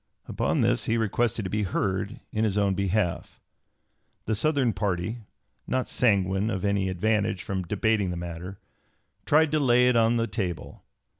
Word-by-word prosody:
Upon - - 0
this - - +2
he 115 - +1
requested 115 0 0
to 95 - -4
be 105 - 0
heard 95 0 -2
in 110 - -1
his 105 -2 0
own 100 -1 +2
behalf. 100 -2 -1 0.9
The 110 - -1
Southern 130 +1 +1
party, 95 +3 -2 0.5
not 130 -1 -1
sanguine 100 -3 +1
of 95 -3 -2
any 100 -1 +1
advantage 105 +2 0
from 95 -1 -3
debating 105 +2 0
the 90 - -4
matter, 85 +2 -7 0.7
tried 155 0 +4
to 155 - +2
lay 125 -3 +4
it 125 - +2
on 115 +1 +3
the 115 - +1
table. 95 -8 -4
105 Hz, 160 wpm, -26 LUFS, 95-115 Hz, 0.9 s, tried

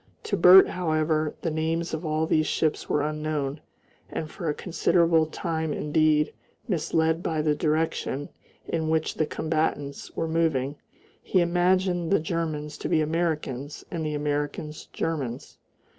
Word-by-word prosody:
To 200 - -1
Bert, 185 +1 +8
however, 155 -3 0
the 165 - 0
names 160 +2 -1
of 160 +2 -3
all 155 0 0
these 155 -1 +2
ships 155 -2 0
were 145 - +2
unknown, 150 -1 -2 0.5
and 155 - -5
for 170 -5 -4
a - - +1
considerable 165 -2 +2
time 160 -1 -2
indeed, 150 0 +2 0.3
misled 160 -2 +1
by 160 -3 -1
the 150 -1 +3
direction 155 -2 -1 0.4
in 160 -1 -1
which 160 0 +1
the 155 - 0
combatants 155 -3 -2
were 165 - -1
moving, 155 -4 0 0.4
he 185 - +1
imagined 175 0 +2
the 195 - +4
Germans 155 -2 -3
to - - -3
be - - +3
Americans 155 -4 -2
and 165 -2 -3
the 150 -1 -2
Americans 150 +1 -3
Germans. 140 -7 -4
155 Hz, 145 wpm, -26 LUFS, 150-165 Hz, 0.5 s, Bert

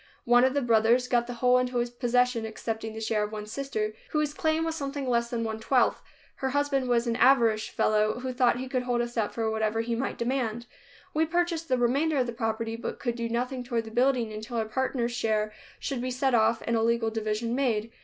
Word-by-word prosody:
One 245 +1 +5
of 260 +1 +2
the 285 - +1
brothers 235 +2 +3
got 240 -1 +1
the 245 - -5
whole 250 +1 +4
into 250 0 -1
his 240 0 0
possession, 245 -1 +1
excepting 220 0 -4
the - - -5
share 220 -1 0
of 210 - -4
one 210 -1 -5
sister, 215 -2 -3 0.2
whose 300 -1 0
claim 315 +1 0
was 325 - -1
something 280 -3 -4
less 235 -1 +1
than 235 -1 -2
one 220 -1 -3
twelfth. 250 +3 +2 0.4
Her 265 - -1
husband 275 -2 0
was 240 0 +2
an 235 -1 0
avaricious 230 -5 +4
fellow 215 0 +2
who 255 0 -4
thought 245 -1 +3
he 260 +1 -4
could 255 -1 -1
hold 245 -1 0
us 240 0 -4
up 220 -3 0
for 225 -1 -1
whatever 220 0 0
he 235 +1 -2
might 255 +4 -3
demand. 240 -2 -1 0.5
We 315 +1 +2
purchased 340 -1 0
the 255 - +3
remainder 280 +6 +2
of 255 - +2
the 240 - -4
property, 225 0 -2
but 230 - -5
could 240 -3 -2
do 235 -1 -3
nothing 250 +2 -2
toward 230 -3 -3
building 245 -2 +2
until 220 +3 -5
our 220 - 0
partner's 240 +1 -1
share 215 -3 0 0.2
should 265 -3 -3
be 255 - -2
set 255 +1 0
off 225 0 +3
and 235 - +1
a 225 - +2
legal 230 0 +1
division 220 +1 -2
made. 230 -4 0
240 Hz, 225 wpm, -28 LUFS, 225-260 Hz, 0.5 s, One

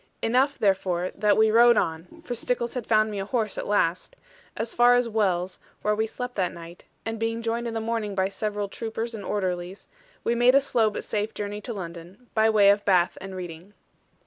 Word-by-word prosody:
Enough, 260 +5 +2
therefore, 185 -3 +1
that 210 -1 +2
we 220 0 +4
rode 235 +1 +6
on 165 - -3
(for 245 - -3
Stickles 240 0 -2
had 250 -4 -5
found 215 -1 +3
me 205 - -4
a 195 - -3
horse 220 -1 -1
at - - -5
last) 185 - 0 0.4
as 225 - -3
far 245 +1 +5
as 245 -1 +2
Wells, 190 -5 0 0.2
where 210 - +2
we 220 +1 0
slept 245 +2 -6
that 185 -2 +1
night; 170 +1 -11 0.2
and 225 0 -3
being 225 +1 -2
joined 230 +1 -1
in 230 - -4
the - - 0
morning 220 -2 -2
by 190 0 +2
several 205 0 -3
troopers 225 +2 -5
and 215 -3 -6
orderlies, 185 -1 -3 0.4
we 235 - +1
made 245 +2 +4
a - - +8
slow 235 -5 +2
but 210 - -5
safe 215 +1 -3
journey 205 0 -4
to 235 - -5
London, 180 +5 -9
by 220 0 +4
way 205 -2 +6
of 205 0 0
Bath 180 -3 +3
and 190 0 -7
Reading. 180 +2 -8
215 Hz, 210 wpm, -25 LUFS, 190-230 Hz, 0.4 s, a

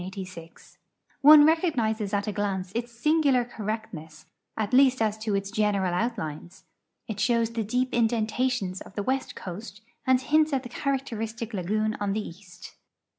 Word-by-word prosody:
One 295 +1 +9
recognizes 240 - +1
at 205 -1 0
a 210 - -2
glance 195 -3 -2
its 235 +1 -3
singular 275 0 +2
correct 220 -2 -5
ness, 155 -1 -10 0.3
at 215 +1 -2
least 260 0 +5
as 215 -2 +1
to 215 -2 -1
its 195 0 -2
general 205 -4 +1
outlines. 180 -5 -4 0.4
It 215 -2 -5
shows 230 +1 +2
the 230 -1 -2
dee]) 250 +5 0
in 235 -1 +3
dentations 220 -3 -1
of 200 - -12
the 205 - -2
west 260 +1 -2
coast 200 +3 -8 0.3
and 260 -1 +5
hints 305 +3 +2
at 265 -1 0
the 245 - -8
characteristic 230 -4 -3
lagoon 215 +3 -1
on 200 -1 -1
the 215 0 -3
east. 180 0 -13
220 Hz, 160 wpm, -26 LUFS, 200-250 Hz, 0.4 s, One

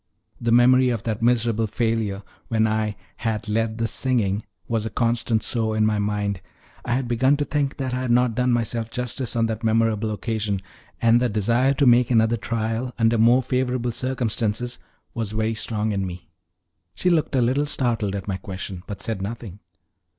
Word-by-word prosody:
The 115 -1 0
memory 125 +2 +5
of 115 -3 -2
that 110 -2 -3
miserable 115 -2 +2
failure, 110 -3 -1 0.2
when 110 -1 +2
I 110 -1 0 0.2
"had 110 -2 -2
led 110 +1 0
the 115 0 0
singing," 115 -5 +1 0.3
was 115 -2 0
a 110 - -3
constant 115 -2 0
sore 110 -2 -1
in 110 - +3
my 105 -1 +1
mind. 100 -2 -1 0.4
I 120 - -1
had 130 0 0
begun 130 +4 +3
to 145 - -1
think 145 -2 -1
that 130 -2 -3
I 125 - -1
had 130 - -2
not 120 0 +3
done 125 +2 +1
myself 115 -1 -1
justice 125 +1 -3
on 115 -1 +2
that 110 -1 -3
memorable 110 -1 +2
occasion, 105 -2 -2 0.4
and 115 +1 +5
the 125 - +2
desire 115 +6 +2
to 140 - +2
make 120 -1 +5
another 115 -1 +3
trial 115 +2 -3
under 115 -1 +3
more 120 +3 +5
favorable 125 -1 -1
circumstances 120 -1 -1 0.3
was 110 -2 -3
very 110 +1 0
strong 110 0 -1
in 100 -1 -1
me. 85 -3 -9 0.6
She 180 - +1
looked 155 -4 +1
a 130 - +3
little 135 +5 +1
startled 115 -8 0
at 100 - -5
my 95 -2 -1
question, 95 -1 -6
but 100 -2 -5
said 110 -4 -3
nothing. 105 -1 -6
115 Hz, 185 wpm, -23 LUFS, 110-125 Hz, 0.6 s, memory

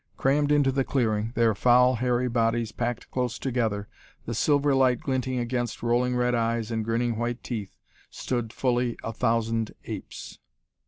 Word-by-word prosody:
Crammed 145 +2 +2
into 145 -2 +4
the 135 0 +1
clearing, 110 -5 0
their 115 -1 +3
foul, 125 +4 +4
hairy 125 +1 +1
bodies 115 -1 0
packed 120 -1 -4
close 125 -2 -1
together, 110 -6 -1 0.4
the 115 - -3
silver 145 +4 +2
light 130 -2 +3
glinting 130 -1 -2
against 120 -1 -2
rolling 125 +1 +1
red 125 0 +1
eyes 115 -1 0
and 110 -1 -1
grinning 115 +1 0
white 120 +1 -3
teeth, 110 -6 -5 0.3
stood 120 -3 -3
fully 125 -2 0
a 115 - -4
thousand 115 -1 0
apes! - - -8
120 Hz, 155 wpm, -26 LUFS, 115-125 Hz, 0.4 s, into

